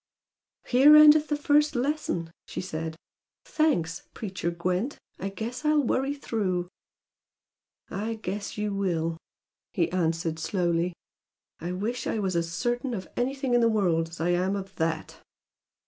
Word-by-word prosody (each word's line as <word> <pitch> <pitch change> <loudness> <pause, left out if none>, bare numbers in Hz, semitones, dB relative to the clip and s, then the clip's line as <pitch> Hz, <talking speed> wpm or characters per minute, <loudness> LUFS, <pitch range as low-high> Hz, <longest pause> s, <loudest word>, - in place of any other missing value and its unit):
"Here 275 +5 +7
endeth 305 0 +8
the 295 - 0
first 295 0 +3
lesson!" 245 - -1 0.2
she - - -5
said. 160 -3 -4 0.5
"Thanks, 175 - +1
preacher 185 -5 -3
Gwent! 180 +9 -2 0.2
I 195 - -3
guess 230 +7 -5
I'll 300 -1 +3
worry 270 +3 0
through!" 185 -10 -2 1.2
"I 220 +3 -2
guess 205 -1 -5
you 210 -1 -1
will!" 165 -4 -1 0.6
he 170 - +1
answered, 165 -2 0
slowly. 170 0 0 0.7
"I 175 +2 -4
wish 220 +7 -3
I - - -1
was 190 -4 -1
as 165 -1 0
certain 240 +8 -1
of 185 -3 -6
anything 265 +1 -1
in 240 - +5
the 230 - +4
world 175 -7 +1
as 165 - -11
I 165 +2 0
am 180 +3 +1
of 195 -1 -6
THAT!" 160 0 -2
195 Hz, 145 wpm, -27 LUFS, 170-245 Hz, 1.2 s, endeth